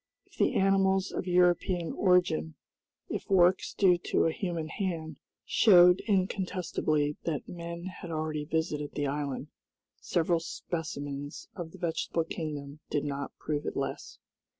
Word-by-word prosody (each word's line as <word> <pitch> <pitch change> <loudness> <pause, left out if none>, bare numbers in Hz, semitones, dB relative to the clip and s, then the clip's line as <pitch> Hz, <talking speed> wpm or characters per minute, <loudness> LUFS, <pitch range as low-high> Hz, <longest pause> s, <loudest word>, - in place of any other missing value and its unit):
If - - -23
the - - +2
animals 195 0 +3
of - - -4
European 180 -1 +2
origin, 175 - +2 0.5
if - - -5
works 185 -1 +4
due 180 -3 +4
to - - +2
a 165 - +3
human 170 -2 -3
hand, 160 -6 -3 0.3
showed 180 -4 +6
incontestably 185 -6 0
that 155 -4 -2
men 170 0 -6
had 185 -1 -7
already 155 -2 -2
visited 150 -2 -2
the 145 - 0
island, 140 0 -3 0.5
several 170 0 +1
specimens 145 -4 -5
of 175 -4 -5
the - - -13
vegetable 165 -1 -1
kingdom 150 -3 -5
did 145 0 -1
not 140 -1 -4
prove 150 -1 -3
it - - -3
less. - - -4
165 Hz, 135 wpm, -30 LUFS, 150-180 Hz, 0.5 s, showed